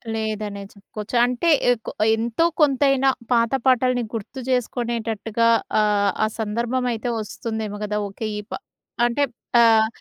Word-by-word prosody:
లేదనే 215 -2 -3
చెప్పుకోవచ్చు. 210 +2 -8
అంటే, 250 +7 0 0.2
ఎకొ 230 -2 -3 0.2
ఎంతో 230 +7 0 0.2
కొంతైన 275 -1 +3 0.3
పాత 230 -1 +2
పాటల్ని 255 -1 +3
గుర్తు 225 +4 -6
చేసుకునేటట్టుగా 230 -2 -1 0.3
ఆహ్, 205 -1 +2
ఆ - - +3
సందర్భమైతే 235 +2 -1
వస్తుందేమో 215 -1 -5
గదా! 210 0 -2
ఓకె 200 +3 -5
ఈప 210 +2 -12 0.5
అంటే 240 +4 +1 0.4
ఆహ్, 220 -1 +5
230 Hz, 115 wpm, -22 LUFS, 215-245 Hz, 0.5 s, ఆహ్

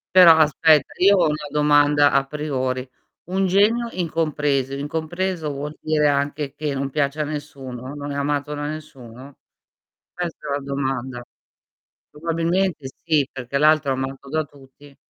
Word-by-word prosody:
Però 175 -3 +9
aspetta 155 -1 +4
io 200 +1 +6
ho - - +4
una 150 -1 -3
domanda 145 -1 +4
a 135 0 +2
priori, 135 -3 -3 0.4
un 190 +1 +1
genio 210 +6 +2
incompreso. 150 - -1
Incompreso, 160 +3 -3
vuol 145 +2 -6
dire 155 -1 +2
anche 145 0 -1
che 150 -1 -3
non 135 0 -2
piace 140 +1 -1
a - - +1
nessuno, 140 -4 -7
non 145 0 -6
è - - -4
amato 145 +1 -1
da 145 0 -4
nessuno? 135 -4 -9 0.8
Questa 175 -2 -5
è - - -3
la 140 - 0
domanda. 135 -3 -3 0.9
Probabilmente 165 0 -1 0.2
sì, 155 -5 +2
perché 130 +1 -4
l'altro 155 -1 +4
amato 135 +1 -5
da 155 +2 0
tutti. 140 0 -18
145 Hz, 145 wpm, -22 LUFS, 140-155 Hz, 0.9 s, Però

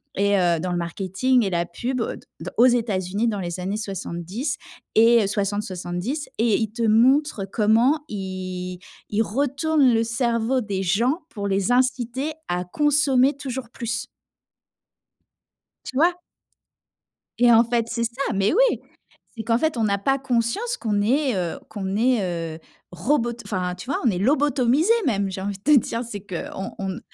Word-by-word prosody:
et 200 0 +2
heu 175 -2 +2
dans 180 +3 -3
le 175 - -1
marketing 195 +8 0
et 195 - 0
la 170 -1 0
pub 245 +9 -3
d - - -3 0.2
d - - -5
aux 240 - +7
États-Unis 215 -4 +1
dans 205 -2 -2
les 175 -1 -4
années 195 +3 -2
70 200 - -4 0.4
et 230 -1 +5
60-70 200 - -3
et 225 -1 +3
il 220 -2 -2
te 235 +2 -6
montre 235 +1 +3
comment 230 +9 +3
il 185 -2 -5 0.3
il 210 +1 +1
retourne 280 +3 +2
le 225 0 +3
cerveau 230 +2 0
des 200 -3 -3
gens 230 - +1
pour 200 -2 -4
les 195 +3 0
inciter 255 +3 0 0.2
à 180 +1 -1
consommer 280 +3 +2
toujours 265 -3 -5
plus. 235 -1 -4 1.8
Tu 260 - -7
vois? 345 +5 +3 1.2
Et 240 0 +6
en 230 +1 +6
fait, 235 -1 0
c'est 235 0 -1
ça! 240 +2 -2
Mais 195 +1 +2
oui! - - +3 0.6
C'est 225 - -5
qu'en 230 +1 +2
fait 315 0 0
on 225 -2 +1
a 200 0 +1
pas 270 +7 +1
conscience 275 - -1
qu'on 210 -3 -1
est, 260 +6 +2
heu 175 -2 -2
qu'on 195 -3 -4
est, 185 -9 0
heu, - - -12 0.3
robot 235 - 0
enfin, 180 -3 -2
tu 235 +7 -10
vois, - - 0
on 240 - +4
est 180 - -2
lobotomisés 275 - +3
même 200 -6 +1
j'ai 190 - -5
envie 200 +1 -3
de 195 - -33
te 295 -1 +6
dire. 230 0 -3
C'est 215 -3 -6
qu’on 190 +1 -5
on 195 - -2
n 185 - -6
225 Hz, 170 wpm, -23 LUFS, 195-255 Hz, 1.8 s, aux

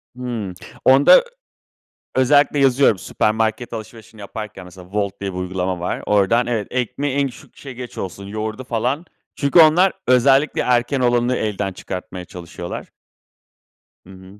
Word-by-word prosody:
Hımm. 120 -6 -5 0.3
Onda 135 - +7
ö - - +4 0.9
özellikle 145 +2 +3
yazıyorum 135 -6 +4
süpermarket 110 +4 -1
alışverişini 110 -1 -9
yaparken 105 -1 -8
mesela 90 0 -13
Volt 100 -2 -2
diye 100 -1 -3
bir 90 - -6
uygulama 90 0 -3
var. 90 - -3
Oradan 105 +4 +3
evet, 115 -4 -2
ekmeği 130 +3 -2
en 140 -1 +2
küçük, 125 - -15
şey, 135 -3 -9
geç 125 0 -9
olsun, 95 +1 -6
yoğurdu 110 +4 -5
falan. 125 +6 -2 0.3
Çünkü 140 +4 +2
onlar 175 +5 +6
özellikle 135 +3 +3
erken 125 +2 +1
olanı 120 0 +2
elden 100 -2 -2
çıkartmaya 90 0 -7
çalışıyorlar. 85 0 -8 1.2
Hı 90 - -17
hı. 95 +2 -15
115 Hz, 140 wpm, -20 LUFS, 95-130 Hz, 1.2 s, Onda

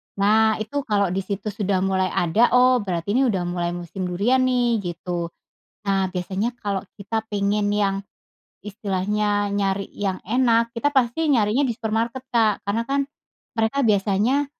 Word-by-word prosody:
Nah, 215 +2 +4
itu 220 +7 -2
kalau 200 -3 +2
di 190 - -1
situ 200 +2 -4
sudah 195 -2 0
mulai 190 -1 +1
ada, 180 +8 +2
oh, 250 0 +5
berarti 185 -3 -3
ini 260 +4 +3
udah 190 -6 0
mulai 175 0 -2
musim 175 +2 -5
durian 205 +9 +2
nih, 245 -3 +2
gitu. 175 -2 -4 0.6
Nah, 195 -2 +1
biasanya 195 +6 -2
kalau 200 -2 -1
kita 220 +2 -3
pengen 205 0 0
yang 200 -2 +1 0.7
istilahnya, 205 +1 -1
nyari 195 -1 0
yang 195 -2 -2
enak, 230 0 +2
kita 285 +5 +1
pasti 275 +4 +1
nyarinya 230 0 +3
di 255 -4 +1
supermarket 230 +3 -2
Kak, 220 -4 +2
karena 210 +3 0
kan 275 +3 0 0.6
mereka 225 +4 +1
biasanya 210 +7 +2
210 Hz, 150 wpm, -23 LUFS, 195-230 Hz, 0.7 s, oh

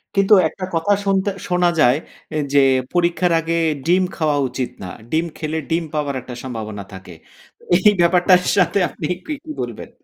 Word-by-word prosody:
কিন্তু 195 +1 +4 0.2
একটা 185 - -6
কথা 165 +5 +2
শুনতে 195 0 +1 0.2
শোনা 180 0 +2
যায় 130 -2 +5 0.6
যে, 145 - +6 0.3
পরীক্ষার 175 0 +1
আগে 165 +1 -2 0.3
ডিম 180 +3 +3
খাওয়া 155 -4 0
উচিত 125 0 -3
না। - - -5 0.2
ডিম 160 +2 +1
খেলে 155 0 -3
ডিম 165 +1 0
পাওয়ার 145 -2 -2
একটা 125 0 -9
সম্ভাবনা 110 -5 -6
থাকে। 95 -2 -11 0.6
এই 200 +3 +5
ব্যাপারটার 180 +1 +4 0.2
সাথে 195 +1 +3
আপনি - - -7 0.2
কি 310 - -3 0.3
বলবেন? - - -6
165 Hz, 155 wpm, -20 LUFS, 140-180 Hz, 0.6 s, যে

